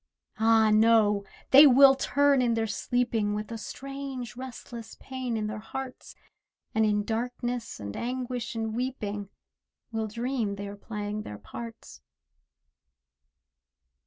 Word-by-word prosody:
Ah, 220 -1 +5
no! 215 -2 +4 0.3
they 285 +3 +10
will 270 +1 +8
turn 280 0 +3
in 235 -2 +2
their 225 0 +1
sleeping 225 -1 0
With 210 +2 -5
a 230 - -4
strange 270 -1 -6
restless 240 -2 -8
pain 255 -3 -4
in 215 - -1
their 215 0 -4
hearts, 260 +4 -7 0.6
And 220 0 +3
in 210 0 +1
darkness, 240 +2 -3
and 100 0 -6
anguish, 245 -1 -3
and 225 -1 -2
weeping, 210 -5 -3 0.6
Will 220 -1 -2
dream 235 -1 -2
they 200 0 -6
are 200 - -7
playing 210 0 -5
their 105 - -7
parts. 225 - -9
230 Hz, 130 wpm, -28 LUFS, 215-250 Hz, 0.6 s, they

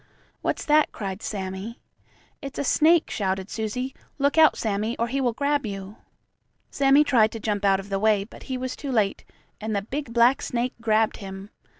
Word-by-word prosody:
"What's - - -2
that?" 300 0 +4
cried 195 -1 -5
Sammie. 195 +3 -5 0.6
"It's 275 -2 -7
a - - -1
snake!" 320 +4 +3
shouted 190 -1 -2
Susie. 250 +4 -3 0.2
"Look 280 0 +1
out, 315 -2 +6
Sammie, 215 +2 -1
or 235 - 0
he 275 +2 -1
will 245 -2 +2
grab 285 +3 0
you." 200 -1 -6 0.7
Sammie 275 +1 +5
tried 225 -7 +3
to 225 - -5
jump 205 -1 -2
out 195 -1 +4
of 195 +1 -9
the 195 -1 -1
way, 210 -1 +3
but 205 - -14
he 260 - -1
was 255 0 -4
too 280 - -5
late, 215 -5 +1 0.4
and 215 0 -2
the 200 - -1
big 270 +3 -5
black 235 +3 +4
snake 245 +1 -2
grabbed 220 -1 +2
him. 195 +1 -9
225 Hz, 190 wpm, -25 LUFS, 200-270 Hz, 0.7 s, out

